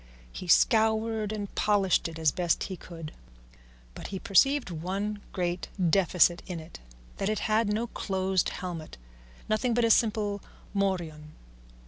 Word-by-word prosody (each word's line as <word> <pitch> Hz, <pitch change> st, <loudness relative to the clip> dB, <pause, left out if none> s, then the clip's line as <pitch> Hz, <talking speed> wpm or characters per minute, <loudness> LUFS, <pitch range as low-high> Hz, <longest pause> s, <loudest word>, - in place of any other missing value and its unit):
He 185 Hz, -, -7 dB
scoured 220 Hz, +2 st, +3 dB
and 205 Hz, -2 st, -5 dB
polished 200 Hz, -5 st, +2 dB
it 165 Hz, -1 st, -8 dB
as 160 Hz, -2 st, +3 dB
best 175 Hz, -1 st, 0 dB
he 190 Hz, -, -4 dB
could, 165 Hz, -3 st, -9 dB, 0.8 s
but -, -, -8 dB
he 195 Hz, -, -5 dB
perceived 265 Hz, +5 st, +3 dB
one 195 Hz, +5 st, -3 dB
great 175 Hz, -1 st, -2 dB
defect 180 Hz, -1 st, +3 dB
in 180 Hz, -3 st, -4 dB
it, 160 Hz, +2 st, -11 dB, 0.4 s
that 195 Hz, -, -1 dB
it 215 Hz, -, 0 dB
had 215 Hz, 0 st, +2 dB
no 220 Hz, +3 st, 0 dB
closed 190 Hz, -4 st, -1 dB
helmet, 175 Hz, -4 st, -6 dB, 0.5 s
nothing 225 Hz, +2 st, +1 dB
but 240 Hz, -1 st, +3 dB
a 230 Hz, -, +4 dB
simple 210 Hz, -3 st, +2 dB, 0.3 s
morion. 170 Hz, -6 st, -2 dB
195 Hz, 140 wpm, -28 LUFS, 175-215 Hz, 0.8 s, a